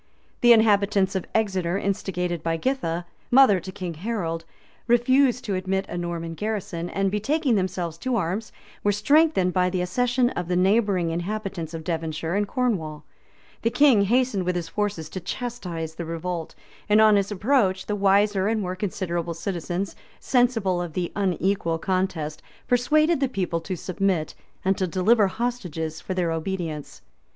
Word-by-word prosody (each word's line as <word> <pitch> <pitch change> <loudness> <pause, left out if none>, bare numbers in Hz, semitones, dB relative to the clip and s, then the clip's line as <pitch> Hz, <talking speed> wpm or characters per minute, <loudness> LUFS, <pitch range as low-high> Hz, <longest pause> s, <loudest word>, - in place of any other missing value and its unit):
The 240 - +6
inhabitants 200 -3 +4
of 190 -2 -3
Exeter, 190 -5 +1
instigated 180 -4 -2
by 165 0 -1
Githa, 175 -7 -1 0.2
mother 245 -7 +6
to 185 +2 -8
King 185 -3 -5
Harold, 165 -3 -3 0.4
refused 250 +1 +3
to 205 - -1
admit 190 +1 -1
a - - -5
Norman 170 -1 -4
garrison, 180 -3 -3
and, 195 -1 0
betaking 265 +7 +1
themselves 180 -4 -1
to 255 +4 -1
arms, 200 +2 -2 0.3
were 205 - +3
strengthened 210 - +3
by 180 -1 +2
the 180 0 -2
accession 245 +6 +1
of 175 -1 -4
the 180 - 0
neighboring 190 -2 +2
inhabitants 175 -2 -4
of 160 - -6
Devonshire 160 0 -3
and 205 +1 +1
Cornwall.[*] 170 -12 -1 0.6
The 230 - +2
king 265 -4 +5
hastened 245 -2 +2
with 180 0 -1
his 170 -2 -3
forces 205 -6 -2
to 185 - -5
chastise 180 -7 -5
the 170 +1 -6
revolt; 165 0 -4 0.3
and 210 +1 +5
on 215 -1 +6
his 200 0 +1
approach, 205 -3 +1
the 210 - -2
wiser 200 0 +3
and 220 0 +1
more 185 -2 -3
considerable 175 -3 -3
citizens, 180 +1 -3 0.2
sensible 225 -8 +2
of 175 -3 -5
the 175 0 -2
unequal 190 -3 0
contest, 175 -4 -2 0.3
persuaded 305 +6 +3
the 275 -2 +1
people 180 -7 -2
to 185 +3 -4
submit, 185 -3 -1 0.3
and 190 0 +2
to 185 - +1
deliver 200 +4 +3
hostages 185 -8 -3
for 185 - -4
their 175 -3 0
obedience. 165 -3 -4
190 Hz, 160 wpm, -24 LUFS, 170-220 Hz, 0.6 s, The